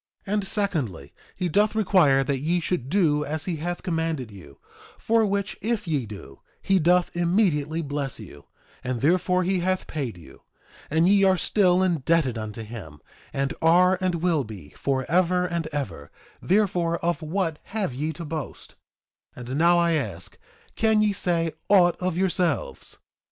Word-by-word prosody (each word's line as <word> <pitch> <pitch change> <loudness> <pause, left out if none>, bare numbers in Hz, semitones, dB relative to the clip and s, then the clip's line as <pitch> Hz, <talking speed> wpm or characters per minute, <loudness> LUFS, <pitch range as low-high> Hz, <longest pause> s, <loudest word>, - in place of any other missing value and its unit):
2:24 200 - -3
And 205 -2 0
secondly, 135 - -2 0.2
he 180 - -2
doth 205 +6 +2
require 180 -10 +4
that 135 -1 -1
ye 165 +6 0
should 165 -6 -2
do 155 -5 +2
as 155 +1 -3
he 175 -3 -2
hath 175 +3 -4
commanded 160 - -2
you; 85 -9 -13 0.4
for 225 -1 +2
which 200 0 -2
if 215 -2 -2
ye 145 -8 -1
do, 95 -10 -11 0.2
he 195 -1 +2
doth 175 +2 +2
immediately 170 -3 +1
bless 140 -3 -3
you; 80 -9 -12 0.4
and 125 -2 -3
therefore 180 +4 +2
he 185 +1 +1
hath 185 +1 -1
paid 135 - -4
you. 85 - -15 0.5
And 160 +3 +3
ye 200 0 +5
are 190 -1 +4
still 185 0 +3
indebted 165 -6 +1
unto 110 0 -6
him, 105 -10 -9 0.3
and 135 +2 -1
are, 180 +3 +4
and 185 -2 0
will 165 -6 +2
be, 105 - -10
forever 170 - 0
and 170 -2 -2
ever; 120 - -5 0.3
therefore, 180 -4 +1
of 170 0 0
what 165 0 -2
have 200 - -3
ye 150 +5 -2
to 165 +3 -7
boast? 155 -2 -6 0.7
2:25 125 -1 -8
And 130 - -2
now 170 +1 +5
I 170 0 +3
ask, 105 - -3 0.4
can 220 -1 +3
ye 210 -1 +2
say 170 -3 0 0.2
aught 180 -4 +5
of 180 -2 -2
yourselves? 180 -5 -1
165 Hz, 165 wpm, -25 LUFS, 135-185 Hz, 0.7 s, ye